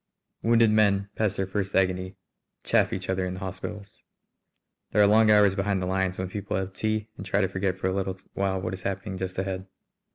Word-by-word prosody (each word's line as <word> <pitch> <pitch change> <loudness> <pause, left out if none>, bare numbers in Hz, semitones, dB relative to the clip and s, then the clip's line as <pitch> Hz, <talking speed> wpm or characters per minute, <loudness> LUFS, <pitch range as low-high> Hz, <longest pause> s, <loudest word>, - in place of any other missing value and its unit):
Wounded 115 -1 +4
men, 100 -2 +3
past 105 -3 0
their 95 - 0
first 95 0 -3
agony, 95 0 +1 0.5
chaff - - +2
each 95 0 -4
other 95 0 0
in 90 0 -3
the - - -7
hospitals. 100 +2 -7 0.9
There 105 - +4
are - - +7
long 110 +2 +5
hours 105 -2 +6
behind 95 0 0
the 90 - -2
lines 95 0 0
when 95 - -2
people 100 0 -3
have 95 0 -3
tea 110 +1 -1
and - - -6
try 100 +1 0
to 95 - +2
forget 95 0 -1
for 95 - -5
a 95 - +1
little 95 -1 -2 0.2
while 95 -1 0
what 95 - -3
is 95 - -6
happening 95 0 -4
just 95 0 -4
ahead. 95 0 -3
95 Hz, 215 wpm, -26 LUFS, 95-100 Hz, 0.9 s, are